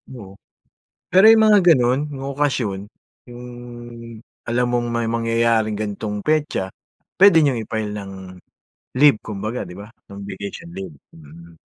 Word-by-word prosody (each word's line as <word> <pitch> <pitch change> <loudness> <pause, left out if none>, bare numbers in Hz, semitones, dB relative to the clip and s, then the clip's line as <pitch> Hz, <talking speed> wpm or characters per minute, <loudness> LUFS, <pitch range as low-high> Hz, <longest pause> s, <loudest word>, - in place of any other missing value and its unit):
Oo. 100 -5 -12 0.7
Pero 190 +3 +5
yung 225 -1 +5
mga 210 -1 +6
ganun 130 -6 +4
yung 135 -1 -7
okasyon, 130 -9 -1 0.5
yung 120 +1 -10 1.0
alam 120 +1 0
mong 120 -1 -1
may 115 -1 -1
mangyayaring 115 -2 +1
ganitong 105 0 -4
petsa, 150 -7 -1 0.5
pwede 195 -4 +7
niyong 135 -7 +1
i-file 110 -1 -4
ng 100 -2 -7 0.9
leave 140 -5 +5
kumbaga, 110 +3 -5
'di 90 - -10
ba? 105 +3 -11 0.2
Ng 100 - -10
vacation 100 +11 -8
leave, 190 -4 -8 0.2
mm. 80 +2 -15
115 Hz, 135 wpm, -21 LUFS, 105-140 Hz, 1.0 s, pwede